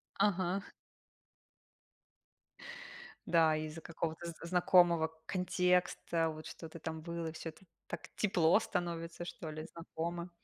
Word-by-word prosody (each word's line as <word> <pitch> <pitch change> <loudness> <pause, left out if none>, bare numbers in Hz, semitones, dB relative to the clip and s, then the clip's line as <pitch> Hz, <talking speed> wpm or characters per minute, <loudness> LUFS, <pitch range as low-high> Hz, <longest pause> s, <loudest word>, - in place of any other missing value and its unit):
Ага. 190 -1 +1 2.6
Да, 160 -2 +5
из-за 155 +1 -4
какого-то 165 0 -3
з 170 - -5
знакомого 175 -2 +5
контекста, 180 -2 +2
вот 155 0 -8
что-то 165 0 -8
там 160 0 -5
было, 170 -1 -3
всё 165 - -6
это 160 - -20 0.2
так - - -6
тепло 180 -4 +4
становится, 175 -5 -3
что 165 -2 -6
ли, 155 0 -5
знакомо. 170 +1 -4
170 Hz, 110 wpm, -35 LUFS, 160-180 Hz, 2.6 s, Да